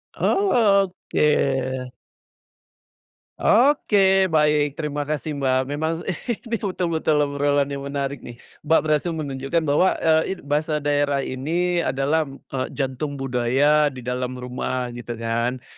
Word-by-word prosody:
Oh, 395 Hz, 0 st, +1 dB, 0.6 s
oke. 130 Hz, -3 st, +1 dB, 1.5 s
Oke 200 Hz, -7 st, +4 dB
baik, 150 Hz, -3 st, +2 dB
terima 150 Hz, -2 st, -3 dB
kasih, 155 Hz, 0 st, -3 dB
Mbak, 130 Hz, -1 st, +2 dB
memang 160 Hz, +3 st, -2 dB, 0.2 s
ini 235 Hz, -, 0 dB, 0.3 s
betul-betul 170 Hz, -4 st, 0 dB
obrolan 145 Hz, 0 st, 0 dB
yang 140 Hz, 0 st, -5 dB
menarik 140 Hz, -1 st, -3 dB
nih. 120 Hz, -, -10 dB, 0.3 s
Mbak, 160 Hz, -, +5 dB
berhasil 155 Hz, +2 st, 0 dB
menunjukkan 140 Hz, +2 st, -2 dB
bahwa, 155 Hz, +5 st, +2 dB
eee, 160 Hz, +3 st, +2 dB
it -, -, -16 dB
bahasa 150 Hz, +1 st, -1 dB
daerah 145 Hz, -1 st, +1 dB
ini 170 Hz, +8 st, -1 dB
adalah, 145 Hz, +1 st, 0 dB
eee, 135 Hz, -1 st, -5 dB
jantung 140 Hz, +1 st, -3 dB
budaya 135 Hz, +4 st, +2 dB
di 130 Hz, -3 st, -6 dB
dalam 125 Hz, +1 st, -3 dB
rumah 125 Hz, 0 st, -4 dB
gitu 120 Hz, 0 st, -6 dB
kan. 115 Hz, +2 st, -2 dB
145 Hz, 120 wpm, -22 LUFS, 130-160 Hz, 1.5 s, Mbak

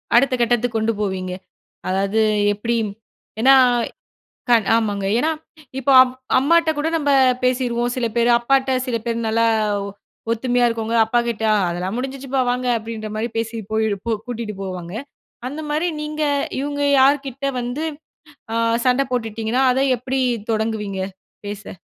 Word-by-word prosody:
அடுத்த 255 Hz, +2 st, +4 dB
கட்டத்துக்கு 240 Hz, 0 st, +1 dB
கொண்டு 220 Hz, +1 st, +1 dB
போவீங்க? 185 Hz, -2 st, -2 dB, 0.6 s
அதாவது, 195 Hz, +3 st, +1 dB, 0.3 s
எப்டி 230 Hz, +3 st, -1 dB, 0.6 s
ஏன்னா, 270 Hz, +3 st, +7 dB, 1.0 s
கண் 230 Hz, -4 st, +4 dB
ஆமாங்க 205 Hz, -3 st, -1 dB
ஏன்னா, 310 Hz, +5 st, +1 dB, 0.5 s
இப்போ 270 Hz, +1 st, 0 dB
அம் 255 Hz, -1 st, -1 dB, 0.3 s
அம்மாட்ட 325 Hz, +4 st, +3 dB
கூட 305 Hz, -, 0 dB
நம்ம 290 Hz, -2 st, 0 dB, 0.3 s
பேசிருவோம். 245 Hz, -1 st, 0 dB
சில 240 Hz, -2 st, 0 dB
பேர் 235 Hz, 0 st, +3 dB
அப்பாட்ட 265 Hz, +2 st, +1 dB, 0.2 s
சில 245 Hz, -2 st, -1 dB
பேர் 230 Hz, 0 st, -1 dB
நல்லா 230 Hz, +1 st, +2 dB, 0.4 s
ஒ -, -, -5 dB, 0.5 s
ஒத்துமையா 245 Hz, +1 st, +1 dB
இருக்கவங்க 230 Hz, 0 st, -2 dB
அப்பாகிட்ட 235 Hz, 0 st, -1 dB, 0.3 s
"அதெல்லாம் 180 Hz, +5 st, -3 dB
முடிஞ்சுச்சுப்பா 270 Hz, +1 st, -3 dB
வாங்க"அப்டின்ற 230 Hz, -3 st, -2 dB
மாதிரி 225 Hz, +2 st, -1 dB
பேசி 225 Hz, 0 st, -2 dB, 0.2 s
போய் 220 Hz, 0 st, +1 dB, 0.2 s
-போ 230 Hz, -, -1 dB
கூட்டீட்டு 230 Hz, -3 st, -5 dB
போவாங்க. 180 Hz, -2 st, -6 dB, 0.6 s
அந்த 290 Hz, +4 st, -6 dB
மாரி 310 Hz, +4 st, 0 dB
நீங்க 305 Hz, 0 st, -4 dB, 0.4 s
இவங்க 285 Hz, +1 st, -3 dB, 0.2 s
யார்க்கிட்ட 275 Hz, 0 st, +2 dB
வந்து 245 Hz, +6 st, -3 dB, 0.7 s
அ -, -, 0 dB, 0.3 s
சண்டை 255 Hz, +2 st, +3 dB
போட்டுட்டீங்கன்னா, 225 Hz, +1 st, -1 dB
அத 260 Hz, -, 0 dB, 0.2 s
எப்படி 260 Hz, +3 st, -2 dB, 0.3 s
தொடங்குவீங்க? 215 Hz, -3 st, -2 dB, 0.5 s
பேச. 205 Hz, -2 st, -7 dB
235 Hz, 130 wpm, -21 LUFS, 220-265 Hz, 1.0 s, ஏன்னா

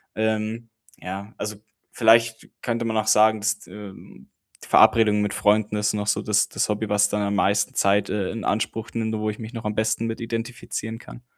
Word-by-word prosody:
Ähm, 110 Hz, +1 st, -2 dB, 0.3 s
ja, 100 Hz, +4 st, -7 dB
also 105 Hz, -1 st, -5 dB, 0.3 s
vielleicht 115 Hz, 0 st, +3 dB
könnte 115 Hz, -1 st, -2 dB
man 110 Hz, -, -2 dB
auch 110 Hz, 0 st, 0 dB
sagen, 110 Hz, 0 st, +4 dB
dass, 105 Hz, 0 st, -1 dB
ähm, 95 Hz, -10 st, -12 dB, 0.3 s
Verabredungen 105 Hz, -2 st, +4 dB
mit 105 Hz, -, -2 dB
Freunden 105 Hz, 0 st, +2 dB
ist 105 Hz, 0 st, 0 dB
noch 105 Hz, -1 st, -2 dB
so -, -, +1 dB
das 105 Hz, -1 st, +2 dB
das -, -, -1 dB
Hobby, 105 Hz, 0 st, -2 dB
was 105 Hz, 0 st, +3 dB
dann 105 Hz, -, -1 dB
am 100 Hz, -, -1 dB
meisten 100 Hz, +1 st, +1 dB
Zeit, 100 Hz, 0 st, +2 dB
äh, 100 Hz, -3 st, -1 dB
in 115 Hz, -2 st, -6 dB
Anspruch 110 Hz, +2 st, -2 dB
nimmt, 110 Hz, -1 st, -2 dB
wo 110 Hz, 0 st, -2 dB
ich 105 Hz, -, -11 dB
mich 115 Hz, +1 st, -8 dB
noch 115 Hz, -2 st, -7 dB
am 105 Hz, -, -1 dB
besten 110 Hz, +1 st, 0 dB
mit 115 Hz, 0 st, -4 dB
identifizieren 115 Hz, -1 st, -5 dB
kann. 120 Hz, -, -13 dB
110 Hz, 195 wpm, -23 LUFS, 105-115 Hz, 0.3 s, sagen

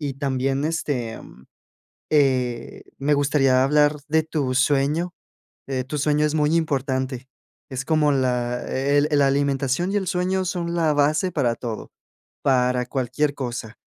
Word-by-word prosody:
Y 140 Hz, -3 st, -3 dB
también, 135 Hz, 0 st, -1 dB
este, 145 Hz, -8 st, -2 dB
mm, 65 Hz, +2 st, -15 dB, 0.7 s
eh, 130 Hz, -5 st, +1 dB, 0.2 s
me 145 Hz, +2 st, +2 dB
gustaría 135 Hz, -2 st, +3 dB
hablar 150 Hz, +1 st, +3 dB
de 160 Hz, +1 st, +3 dB
tu 150 Hz, -5 st, -2 dB
sueño, 145 Hz, +6 st, +1 dB, 0.5 s
eh, 130 Hz, -2 st, -2 dB
tu 145 Hz, +3 st, -4 dB
sueño 150 Hz, +1 st, +2 dB
es 150 Hz, -, -1 dB
muy 155 Hz, +1 st, +2 dB
importante. 130 Hz, -4 st, -1 dB, 0.4 s
Es 130 Hz, 0 st, -4 dB
como 155 Hz, -2 st, +3 dB
la 125 Hz, -2 st, 0 dB
e 140 Hz, +2 st, +1 dB
el 145 Hz, +1 st, +3 dB
la 145 Hz, -1 st, +4 dB
alimentación 140 Hz, +4 st, 0 dB
y -, -, -2 dB
el 190 Hz, -2 st, -2 dB
sueño 185 Hz, +2 st, 0 dB
son 170 Hz, -1 st, -2 dB
la 160 Hz, -3 st, +2 dB
base 150 Hz, +5 st, +2 dB
para 130 Hz, -7 st, +1 dB
todo, 115 Hz, -2 st, -6 dB, 0.5 s
para 125 Hz, -2 st, +2 dB
cualquier 140 Hz, +3 st, -1 dB
cosa. 120 Hz, -3 st, -5 dB
140 Hz, 150 wpm, -23 LUFS, 130-150 Hz, 0.7 s, la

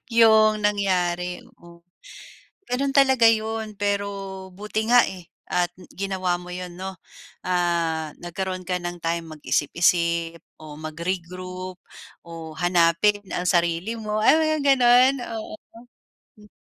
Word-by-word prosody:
yung 215 Hz, -2 st, +5 dB
nangyari, 180 Hz, -3 st, 0 dB, 0.2 s
oo. 170 Hz, 0 st, -17 dB, 0.8 s
Ganun 275 Hz, +3 st, -1 dB
talaga 265 Hz, -3 st, +4 dB
yun, 220 Hz, -1 st, -3 dB
pero 200 Hz, 0 st, 0 dB, 0.4 s
buti 210 Hz, +4 st, -3 dB
nga, 245 Hz, -, +8 dB
eh, 180 Hz, -3 st, -9 dB, 0.2 s
at 175 Hz, -1 st, 0 dB, 0.2 s
ginawa 190 Hz, -2 st, -1 dB
mo 180 Hz, 0 st, -10 dB
yun 180 Hz, -1 st, -7 dB
'no. 190 Hz, +1 st, -5 dB, 0.5 s
Ah, 170 Hz, -3 st, 0 dB
nagkaroon 185 Hz, +2 st, -4 dB
ka 180 Hz, -, 0 dB
ng 175 Hz, 0 st, -5 dB
time 165 Hz, 0 st, -2 dB
mag-isip-isip 170 Hz, +2 st, +1 dB, 0.2 s
o 150 Hz, -1 st, -10 dB
magre-group 180 Hz, +3 st, -5 dB, 0.5 s
o 165 Hz, -1 st, -8 dB
hanapin 175 Hz, +4 st, +3 dB
ang 180 Hz, -, -2 dB
sarili 175 Hz, +5 st, +1 dB
mo, 215 Hz, -1 st, -3 dB
ah, 215 Hz, -, +5 dB
mga 310 Hz, -1 st, +1 dB, 0.2 s
ganun, 250 Hz, +1 st, +5 dB, 0.3 s
oo. 215 Hz, -, -8 dB, 0.8 s
Mm. 210 Hz, 0 st, -18 dB
185 Hz, 120 wpm, -24 LUFS, 170-215 Hz, 0.8 s, nga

